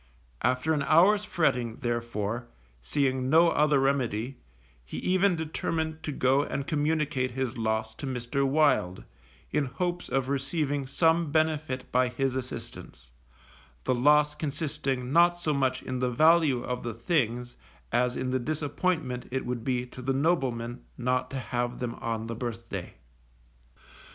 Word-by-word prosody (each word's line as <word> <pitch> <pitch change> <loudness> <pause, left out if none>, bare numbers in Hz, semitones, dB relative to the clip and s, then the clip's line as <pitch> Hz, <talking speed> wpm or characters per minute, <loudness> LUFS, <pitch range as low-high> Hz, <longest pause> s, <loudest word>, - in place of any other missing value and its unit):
After 130 +5 +1
an 150 - 0
hour's 185 +9 +5
fretting, 125 - 0
therefore, 120 -1 -2 0.3
seeing 130 - 0
no 165 +3 +6
other 150 -1 +3
remedy, 130 -2 0 0.4
he 65 - -8
even 185 0 +2
determined 160 0 -2
to 150 - -4
go 135 0 +3
and 140 -1 -3
communicate 150 -3 0
his 130 0 -3
loss 110 -1 -1
to 140 - -5
Mr. 130 +2 -1
Wild, 135 -10 +2 0.5
in 150 -1 +1
hopes 175 +7 -3
of 135 -1 0
receiving 140 0 -1
some 160 +2 +2
benefit 155 -4 0
by 125 0 +3
his 130 +1 -1
assistance, 125 - -7 0.7
the - - +1
loss 150 +4 +4
consisting 140 -4 -3
not 175 +1 +5
so 155 -3 0
much 130 -2 0
in 130 -1 -3
the 125 0 +1
value 155 -1 +4
of 125 -1 -3
the 115 -2 -4
things 120 -2 -1 0.4
as 125 +1 +2
in 130 0 -2
the 130 - +1
disappointment 145 -1 -2
it 130 +1 -2
would 120 -2 -3
be 125 -1 0
to 125 0 -10
the 135 +1 0
nobleman 130 -6 0
not 125 +1 0
to 135 - -4
have 120 -1 -2
them 120 -2 -3
on 115 -1 -2
the 115 - -4
birthday. 115 -5 -5
130 Hz, 145 wpm, -28 LUFS, 120-155 Hz, 0.7 s, no